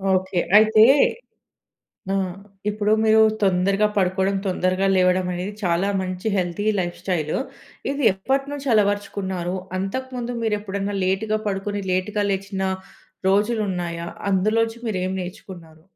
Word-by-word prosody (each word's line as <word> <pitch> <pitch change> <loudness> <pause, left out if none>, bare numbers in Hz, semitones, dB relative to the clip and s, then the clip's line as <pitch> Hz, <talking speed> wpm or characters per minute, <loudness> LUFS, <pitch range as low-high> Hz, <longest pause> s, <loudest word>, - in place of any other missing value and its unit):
Okay. 185 0 0 0.2
అయితే 215 0 +6 1.3
ఆ! - - +1 0.5
ఇప్పుడు 210 0 0
మీరు 220 0 +5 0.2
తొందరగా 195 +2 +3
పడుకోడం, 190 +1 +1
తొందరగా 185 +1 +1
లేవడం, 185 0 +3
అనేది 180 +4 -4
చాలా 175 +2 +1
మంచి 185 +3 -3
హెల్తీ 180 +1 -1
లైఫ్ 175 -1 -2
స్టైలు. 165 -5 -1 0.5
ఇది 280 0 -2
ఎప్పటినుంచి 275 +7 -2
అలవర్చుకున్నారు? 200 -3 0 0.2
అంతకు 260 +8 -3
ముందు 245 0 -3
మీరెప్పుడన్నా 205 -2 -2
లేట్‌గ 195 +4 0
పడుకొని, 200 +1 -2
లేట్‌గ 185 +3 -1
లేచిన 195 0 -2 0.7
రోజులున్నాయా? 190 -5 0 0.2
అందులోంచి 225 +4 +1
మీరేమి 185 -3 -1
నేర్చుకున్నారు? 175 -3 -10
195 Hz, 110 wpm, -22 LUFS, 185-210 Hz, 1.3 s, అయితే